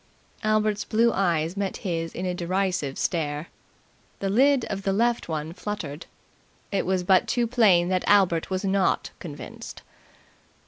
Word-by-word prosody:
Albert's 215 -1 +1
blue 230 +1 +2
eyes 170 -3 0
met 200 -1 -2
his 165 -2 -2
in 180 - -3
a 180 - -1
derisive 180 -5 -1
stare. 150 -2 -2 0.7
The 195 -1 -2
lid 270 +3 +4
of 195 -1 -4
the 195 0 0
left 235 +1 +1
one 155 0 -3
fluttered. 170 -7 -6 0.6
It 195 -3 -1
was 185 -1 +1
but 185 +1 +4
too 240 -1 +1
plain 210 -8 +4
that 185 -1 +1
Albert 185 -5 +3
was 190 +1 -2
not 195 -1 +1
convinced. - - -9
190 Hz, 145 wpm, -25 LUFS, 170-210 Hz, 0.7 s, lid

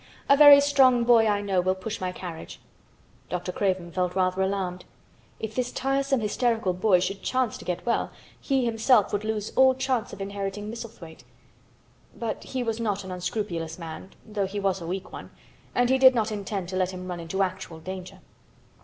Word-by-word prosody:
A 280 - +6
very 290 -1 +10
strong 270 -4 +4
boy 235 -2 +5
I 205 -1 +1
know 195 -3 +1
will 185 +1 +1
push 210 +3 -6
my 185 -1 -2
carriage." 180 -3 -8 0.7
Dr. 180 +1 -3
Craven 185 -3 -1
felt 180 0 -1
rather 185 0 +1
alarmed. 190 -2 -2 0.6
If 220 0 -5
this 250 0 -2
tiresome 270 -1 0
hysterical 225 -2 0
boy 185 0 +3
should 195 +2 -3
chance 255 -1 0
to - - -11
get 180 -1 -3
well 235 - 0 0.3
he 270 -3 0
himself 225 -1 +3
would 205 0 -1
lose 215 -1 -3
all 260 0 +5
chance 260 -3 -1
of - - -9
inheriting 200 +1 -4
Misselthwaite; 220 -9 -10 0.9
but 230 -2 -4
he 255 -1 -3
was 225 -1 -2
not 205 -3 -1
an 190 - -8
unscrupulous 180 -3 -4
man, 165 +2 -8 0.2
though 210 -3 -2
he 205 +2 -4
was 190 -2 0
a 165 - -6
weak 190 +3 -5
one, - - -8 0.5
and 245 0 +3
he 265 - +3
did 260 -1 +7
not 220 -1 0
intend 200 -3 -4
to 185 - -5
let 185 -1 +1
him 185 -1 -7
run 180 -1 -5
into 180 +4 -1
actual 185 -3 -5
danger. 185 +2 -8
200 Hz, 190 wpm, -26 LUFS, 185-235 Hz, 0.9 s, very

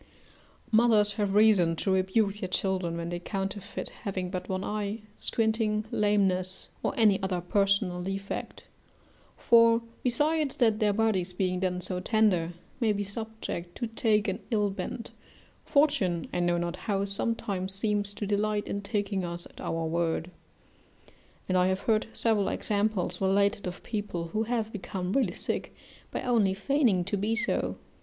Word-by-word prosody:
Mothers 220 -2 +4
have 205 -2 -1
reason 205 -6 +5
to 190 - -1
rebuke 190 +2 +2
their 185 -4 -3
children 185 -3 -1
when 170 0 -3
they 175 0 -3
counterfeit 195 +2 -4
having 185 -4 -3
but 185 -2 -4
one 190 0 -1
eye, 210 +1 -3
squinting, 220 -1 0
lameness, 190 -3 +1
or - - -1
any 210 -4 +4
other 190 -2 -1
personal 195 0 +1
defect; 195 +2 -4 0.7
for, 230 0 +5 0.2
besides 295 +3 +1
that 220 -4 +3
their 210 -1 +3
bodies 200 -4 +1
being 180 0 0
then 180 -1 0
so 180 0 -1
tender, 185 -5 +2 0.3
may 230 -4 +3
be 205 0 -1
subject 200 -4 -6
to 240 - -2
take 220 -2 +1
an 195 +1 -1
ill 210 -3 +1
bent, 195 +4 -5 0.5
fortune, 280 - +2
I - - 0
know 175 0 +2
not 170 +1 -2
how, 200 +1 -1
sometimes 200 -2 -2
seems 205 0 0
to 205 - -3
delight 205 +1 0
in 200 - -2
taking 200 -2 -1
us 175 0 -3
at - - -13
our 165 0 -2
word; 165 +1 -1 1.2
and 185 - 0
I 180 0 +4
have 190 +1 0
heard 215 0 +1
several 220 -4 +1
examples 205 -4 -1
related 200 +2 +2
of 180 +1 -6
people 205 -7 -3
who 215 +5 -1
have 225 -2 -1
become 190 -2 -4
really 240 -10 +2
sick, - - -3 0.3
by - - -4
only 220 -6 +2
feigning 225 -4 +2
to 200 +3 -2
be 215 +3 0
so. 225 - 0
200 Hz, 155 wpm, -29 LUFS, 185-220 Hz, 1.2 s, reason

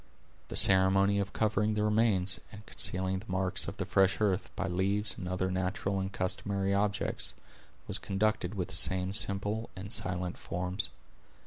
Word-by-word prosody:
The - - -7
ceremony 95 +1 +6
of 100 0 -3
covering 105 0 0
the 105 - 0
remains, 105 -4 +2
and 105 0 -12
concealing 95 +1 0
the 100 - -14
marks 95 -1 +1
of - - -6
the - - -3
fresh 95 0 +2
earth, 100 -4 0
by - - -3
leaves 100 +4 0
and 90 - -7
other 95 0 -2
natural 95 +1 -2
and 95 0 -4
customary 100 +1 -2
objects, 100 +1 -1 0.5
was - - -1
conducted 105 -1 -1
with 90 -4 -3
the - - -9
same 95 +1 +2
simple 105 +2 +1
and 100 +4 -6
silent 90 -1 -1
forms. 90 +3 -2
95 Hz, 160 wpm, -30 LUFS, 95-105 Hz, 0.5 s, ceremony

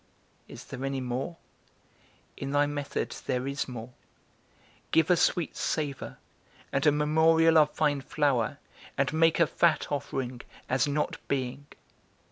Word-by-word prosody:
Is - - -11
there 135 0 -7
any 135 0 -1
more? 130 +6 -3 1.0
In 135 - -5
thy 145 +1 +3
method 145 -1 -3
there 125 0 0
is 140 0 -2
more: 120 -1 -7 1.0
Give 165 +2 +3
a - - +7
sweet 170 0 +1
savour, 145 -4 -3 0.6
and 135 +3 +2
a - - +7
memorial 160 +2 +4
of 150 -1 +5
fine 145 -3 +1
flour, 140 -2 0 0.4
and 140 +1 +1
make 165 +1 +3
a 170 - +6
fat 165 0 +1
offering, 130 -3 -3 0.3
as 130 +3 +1
not 145 +1 -1
being. 135 +1 -3
145 Hz, 135 wpm, -28 LUFS, 135-155 Hz, 1.0 s, a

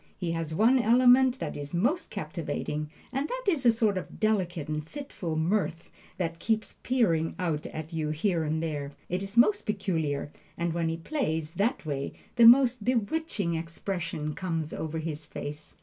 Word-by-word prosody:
He 175 -3 -2
has 165 -1 -3
one 235 +7 +5
element 250 +2 +5
that - - -4
is 145 +3 -5
most 260 - +1
captivating, 150 -1 -4 0.2
and 275 +3 0
that - - -3
is 300 -10 +3
a - - +8
sort 220 -4 +1
of - - -10
delicate 185 -7 0
and 150 0 -2
fitful 275 - -5
mirth 165 +1 0 0.3
that 165 -2 -2
keeps 220 -2 -1
peering 170 -11 +1
out 165 -4 -1
at 155 +1 -7
you 155 -2 -1
here 165 +2 0
and 160 +1 -1
there. 145 -3 -3 0.2
It 180 +2 -1
is 195 +3 -6
most 400 - +4
peculiar, 160 -9 -1 0.3
and 170 -1 -1
when 165 -1 0
he 165 - -2
plays 165 - -2
that 215 - 0
way, 140 -2 -3 0.2
the 235 -2 +8
most 250 -2 +6
bewitching 230 - 0
expression 165 -1 -3
comes 165 -3 -3
over 160 0 -3
his 160 -1 -4
face. 150 0 -7
170 Hz, 170 wpm, -28 LUFS, 160-230 Hz, 0.3 s, a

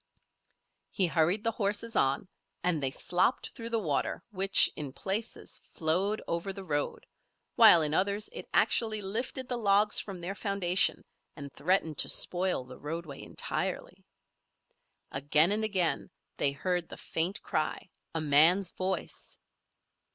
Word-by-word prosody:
He 190 - +2
hurried 175 +5 +1
the 230 - +1
horses 215 +1 -2
on, 135 +5 +1 0.4
and 175 -4 +1
they 135 - +1
slopped 180 - 0
through 230 -2 -6
the 230 - 0
water 155 -10 -2
which, 195 -1 +4
in 145 -4 -5
places, 205 - -4
flowed 185 +7 -1
over 170 +4 -2
the 195 0 -9
road, 145 -5 -2 0.5
while 165 -2 +7
in 150 0 -1
others 200 +4 0
it - - -7
actually 220 -2 +2
lifted 240 +6 -4
the 245 -2 -3
logs 205 0 +3
from 195 -3 -6
their 175 +3 -4
foundation 195 -3 +1 0.3
and 140 -3 -9
threatened 160 0 0
to - - +4
spoil 180 -5 +1
the 125 0 -13
roadway 155 -1 -6
entirely. - - -5 1.1
Again 150 +5 +4
and 215 +1 +1
again 190 -6 0 0.3
they 140 - +3
heard 175 +4 -2
the - - -9
faint 170 +5 -1
cry, 155 - -2 0.3
a 160 - -1
man's 160 +6 +5
voice. 185 +1 -4
185 Hz, 140 wpm, -29 LUFS, 155-205 Hz, 1.1 s, while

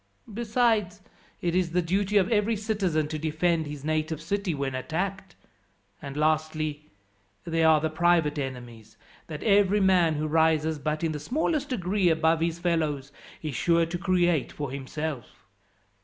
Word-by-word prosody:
Besides, 220 -3 +1 0.4
it 170 -1 -1
is 180 -2 0
the 180 - +3
duty 195 +4 +1
of 190 -2 +4
every 220 +1 +2
citizen 195 -8 -1
to 155 0 -4
defend 160 +1 0
his 145 -1 -7
native 155 0 -1
city 185 +1 -2
when 140 -1 -3
attacked. 180 +7 -4 0.7
And 140 0 -7
lastly, 155 -1 -1 0.5
there 165 -1 +1
are 155 -1 +6
the 160 +1 -2
private 165 -3 +2
enemies, 120 -5 -7 0.3
that 150 -2 -7
every 205 -1 +4
man 180 -5 +3
who 150 +1 -2
rises 160 0 +2
but 155 +3 -2
in 165 - +1
the 150 - -4
smallest 295 - -1
degree 195 -5 +1
above 160 0 +2
his 165 0 0
fellows 155 -6 -1 0.3
is 155 -3 -3
sure 170 +6 +2
to 170 +2 -4
create 175 -5 +1
for 145 -3 -5
himself. 140 0 -6
165 Hz, 155 wpm, -27 LUFS, 150-185 Hz, 0.7 s, are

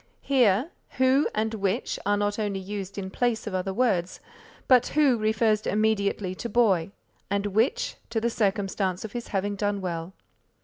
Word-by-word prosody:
Here 250 - +3 0.3
who 260 +3 +3
and 220 +1 0
which 200 +2 -1
are 205 0 +3
not 205 +1 -1
only 205 -2 -1
used 195 0 -6
in 190 -1 -5
place 240 0 0
of 210 - -5
other 185 +1 -1
words, 190 -5 0 0.5
but 255 -2 +5
who 285 -5 +5
refers 215 -1 +1
immediately 205 -3 0
to 235 +5 -6
boy, 200 -7 +2 0.4
and 200 0 0
which 225 - 0
to 230 -1 0
the 235 +1 0
circumstance 195 -3 -1
of 215 - -7
his 240 0 -5
having 205 0 -1
done 205 0 -1
well. 170 -1 -4
205 Hz, 165 wpm, -26 LUFS, 195-230 Hz, 0.5 s, but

